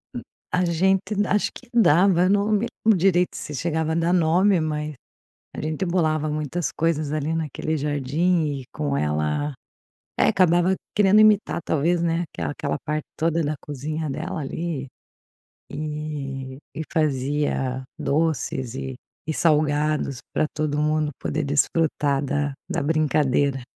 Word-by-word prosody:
Hum. - - -3 0.3
A 180 0 +2
gente 190 +4 +1
acho 210 - +1
que 255 - -13
dava, 185 -4 +5
não 205 +1 +2
me 215 +2 +2 0.2
lembro 220 -3 +5
direito 180 0 +2
se 150 - -6
chegava 160 +2 -1
a - - -1
dar 170 +1 +2
nome, 180 +2 +4
mas 150 -1 -2 0.6
a - - -5
gente 155 +4 -2
bolava 155 -4 +1
muitas 155 +3 -2
coisas 155 -2 0
ali 155 +1 -1
naquele 160 0 -2
jardim 150 +4 +1
e - - -10
com 70 -2 -1
ela 75 - 0 0.7
é, - - +5
acabava 180 0 +3 0.2
querendo 205 0 +5
imitar, 215 -4 +4
talvez, 165 +3 +1
né, 170 0 +1
aquela 80 -4 -3
aquela 75 - -3
parte 155 0 -2
toda 165 0 +1
da 145 - 0
cozinha 150 +2 -4
dela 165 +4 -4
ali, 145 -1 -4 0.8
e 145 -3 -5 0.2
e 160 - -3
fazia 135 -3 0
doces 140 -5 -1
e 130 0 -5 0.3
e 160 - -1
salgados 150 -3 +1
pra 155 - +1
todo 150 -1 -1
mundo 155 0 +1
poder 155 +1 -2
desfrutar 145 -1 +1
da 145 0 -1
da - - -1
brincadeira. 145 -3 +1
155 Hz, 140 wpm, -24 LUFS, 145-170 Hz, 0.8 s, dava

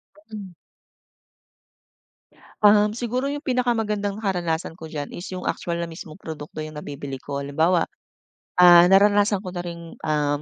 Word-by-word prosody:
Ka 205 - -21
Hmm. 200 -4 -8 2.1
Um, 210 0 +5
siguro 245 +3 -2
'yung 290 +1 -3
pinakamagandang 225 -6 -1
karanasan 175 -4 -2
ko 160 - -8
diyan 150 -2 -6
is 175 - -7
'yung 180 - -5
actual 170 -1 -3
na 170 - -3
mismong 160 +1 -10
produkto 155 -1 -7
'yung 155 0 -8
nabibili 140 -2 -6
ko. 140 +1 -5
Halimbawa 160 +5 +1 0.7
ah, 175 -1 +9
naranasan 205 +1 +5
ko 180 - -6
na 175 - -3
ring 170 -1 -8
um, 150 -1 0
175 Hz, 145 wpm, -23 LUFS, 155-205 Hz, 2.1 s, ah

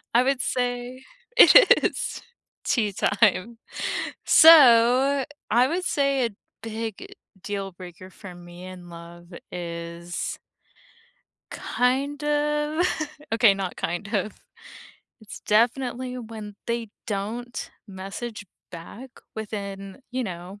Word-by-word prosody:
I 245 - +6
would 270 0 0
say 245 +1 -3 0.3
it - - +8
is - - -2 0.4
tea 215 -5 0
time. 205 +3 +1 0.7
So, 270 -3 +7 0.2
I 240 +3 +4
would 360 +5 -2
say 275 -3 +1
a - - -1 0.3
big 225 -2 -6 0.3
deal 195 -2 -4
breaker 180 +1 -12
for 190 0 -12
me 175 0 -12
in 180 -1 -11
love 170 +1 -12 0.2
is 170 0 -5 1.1
Kind 275 +4 -1
of, 295 +3 0 0.5
okay, 225 -3 +5
not 195 -2 -4
kind 175 +4 -4
of. 210 - -1 0.9
It's 215 -2 -11
definitely 250 +3 0
when 220 -3 -9
they 235 -1 -2 0.2
don't 230 +4 -5 0.2
message 200 +3 -7 0.2
back 205 +9 -10 0.2
within, 200 -1 -7
you 255 0 -2
know. 185 +1 -8
220 Hz, 105 wpm, -24 LUFS, 190-255 Hz, 1.1 s, it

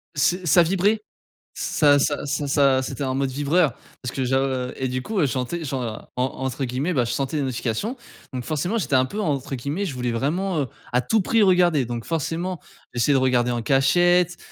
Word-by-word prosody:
C 150 +6 +2
ça 175 +2 +6
vibrait. 195 +5 +1 0.5
Ça 145 -2 +3
ça 145 +1 0
ça 145 0 -2
ça 140 -2 +3
c'était 135 +2 -4
un 130 -1 -1
mode 135 0 0
vibreur, 145 +2 +2 0.3
parce 125 - -4
que 130 - -1
j'av 130 -1 0
et 130 - -2
du 130 0 -3
coup, 215 +4 -2
je 145 - +3
sentais, 130 +6 -3
genre, 125 -6 -5
en 125 - 0
entre 130 +1 -3
guillemets, 130 +8 -2
«je 125 - +4
sentais 135 +5 -2
des 145 - 0
notifications» 130 - -2 0.4
donc 125 -1 -3
forcément, 160 - -1
j'étais 150 -8 0
un 130 0 +4
peu, 200 +11 -6
entre 140 -7 -2
guillemets, 145 +10 -3
je 165 - -4
voulais 125 -1 -2
vraiment, 160 +8 -1
heu, 135 - -2 0.3
«à 125 - +3
tout 220 - +1
prix 225 +3 +3
regarder». 175 -7 +4
Donc 120 -1 -5
forcément, 165 +3 -2 0.4
j'essaie 120 +4 +2
de 140 - +4
regarder 125 -2 +2
en 120 -1 -1
cachette, 175 +8 +3
140 Hz, 205 wpm, -23 LUFS, 130-175 Hz, 0.5 s, ça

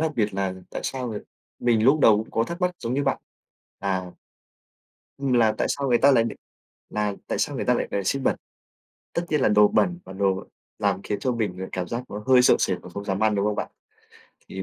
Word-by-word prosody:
đặc 155 - -3
biệt 105 -3 0
là 95 -1 -1 0.2
tại - - -4
sao 130 -2 -3
người 105 -2 -4 0.4
mình 115 -3 +2
lúc 145 +4 +5
đầu 110 -6 +7
cũng 110 - -4
có 115 - +1
thắc 170 +6 -6
mắc 180 0 +2
giống 120 +1 -3
như 140 +1 0
bạn 135 - +1 0.6
là 95 -2 -2 1.1
Ừm, 135 -1 -1
là 115 -3 +4
tại - - +1
sao 140 -1 -1
người 120 - +4
ta 140 +3 +6
lại 115 -4 +4
đ - - -3 0.6
là 105 -1 -1
tại - - -2
sao - - -1
người - - -2
ta - - +3
lại - - -1
là 100 - -1
xiên 135 +8 0
bẩn. - - +2 0.8
Tất 170 - 0
nhiên 150 - +1
là - - +4
đồ 105 0 +6
bẩn 175 +9 +1
và - - -10
đồ 95 0 0 0.3
làm 95 - 0
khiến 105 - -3
cho 130 - 0
mình, 105 -6 -2
ờ, 95 - -4
cảm 90 -1 -3
giác 120 +1 -3
nó 105 +1 -6
hơi 130 -1 +7
sợ - - +6
sệt - - 0
và - - -10
không 100 - -6
dám 95 0 -2
ăn, 110 -1 +3
đúng 100 - +1
không 105 -1 0
bạn? - - -3 0.8
Thì 95 - -5
110 Hz, 245 wpm, -25 LUFS, 100-130 Hz, 1.1 s, đầu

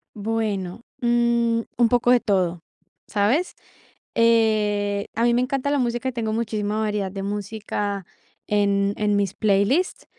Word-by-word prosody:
Bueno, 210 -2 -2 0.2
mm, 235 -1 +2 0.2
un 240 -1 +5
poco 245 +1 +2
de 250 -1 +5
todo, 185 -6 0 0.5
¿sabes? 230 - +1 0.6
Eh, 210 -3 +2
a 230 - -1
mí 240 - +4
me 240 - +3
encanta 275 +2 -1
la 290 - +1
música, 245 +1 -1
tengo 225 -3 -2
muchísima 215 -2 -2
variedad 210 -3 -1
de 195 -1 -5
música 205 -1 -3 0.4
en 200 -1 +2
en 210 -1 +1
mis 200 -2 0
playlists, 215 - +1
215 Hz, 135 wpm, -23 LUFS, 205-235 Hz, 0.6 s, un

